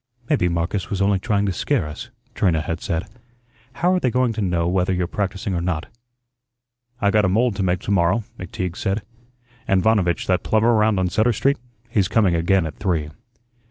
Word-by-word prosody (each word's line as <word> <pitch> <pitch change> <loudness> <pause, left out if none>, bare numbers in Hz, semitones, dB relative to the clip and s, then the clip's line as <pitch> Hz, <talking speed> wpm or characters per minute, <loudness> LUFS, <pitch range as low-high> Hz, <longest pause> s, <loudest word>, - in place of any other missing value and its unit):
"Maybe 90 -12 +2
Marcus 85 +3 -2
was 100 - -2
only 100 0 +2
trying 100 -1 0
to 95 - 0
scare 80 - 0
us," 75 0 -8 0.2
Trina 85 -5 +1
had 80 +2 -4
said. 85 +4 -2 0.7
"How 175 +7 +1
are 185 - +2
they 130 - +1
going 125 -1 +1
to 110 - -3
know 85 -3 0
whether 90 +1 +1
you're 90 -1 0
practising 100 +1 -3
or 85 - -1
not?" 85 +3 -3 1.0
"I 100 -2 +2
got 105 0 +3
a 95 - +2
mould 115 +3 +2
to - - -1
make 90 -1 0
to - - -4
morrow," 95 +4 +2 0.2
McTeague 90 -1 -4
said, 100 +2 -1 0.6
"and 95 -2 +2
Vanovitch, 100 -6 +2
that 95 0 +1
plumber 110 +2 +2
round 110 -2 +3
on 90 -1 +1
Sutter 110 +7 +2
Street, 140 +6 +1 0.3
he's 100 -4 +1
coming 100 -5 +2
again 85 +2 +2
at 80 - -7
three." 80 -6 -1
95 Hz, 195 wpm, -22 LUFS, 90-110 Hz, 1.0 s, got